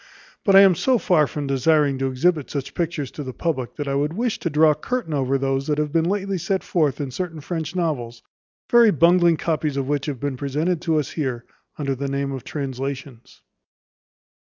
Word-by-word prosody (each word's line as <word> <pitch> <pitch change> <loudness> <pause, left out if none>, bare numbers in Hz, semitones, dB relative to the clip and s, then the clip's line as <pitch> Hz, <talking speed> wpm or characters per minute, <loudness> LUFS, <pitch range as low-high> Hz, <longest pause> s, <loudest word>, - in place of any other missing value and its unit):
But 195 -4 +4
I 195 - +10
am 195 -2 +7
so 255 +8 +2
far 160 -8 +3
from 145 +3 -5
desiring 140 +1 +2
to 135 - 0
exhibit 145 +3 +1
such 140 -1 -4
pictures 165 -5 -3
to 150 - -7
the 130 -1 -6
public, 140 -8 -2
that 145 -2 -4
I 140 - -1
would 145 +3 0
wish 230 +3 -1
to 170 - -2
draw 155 +1 +5
a - - 0
curtain 215 +2 -3
over 135 -1 +1
those 135 0 -1
that 150 -1 0
have 150 -1 -1
been 165 +1 +1
lately 195 -1 -1
set 190 +3 -1
forth 155 -6 0
in 140 -3 -3
certain 165 +3 -4
French 160 +2 -4
novels; 125 -10 -2 0.4
very 235 -2 +6
bungling 170 -1 +4
copies 155 -3 -1
of 135 -1 -1
which 145 0 -1
have 140 -4 -4
been 140 -1 -3
presented 155 +6 -1
us 155 -3 +1
here 130 -6 -3 0.3
under 140 -2 -1
the 140 +2 -4
name 140 0 -2
of 135 -3 -6
translations. 135 -2 -6
150 Hz, 200 wpm, -22 LUFS, 135-170 Hz, 0.4 s, I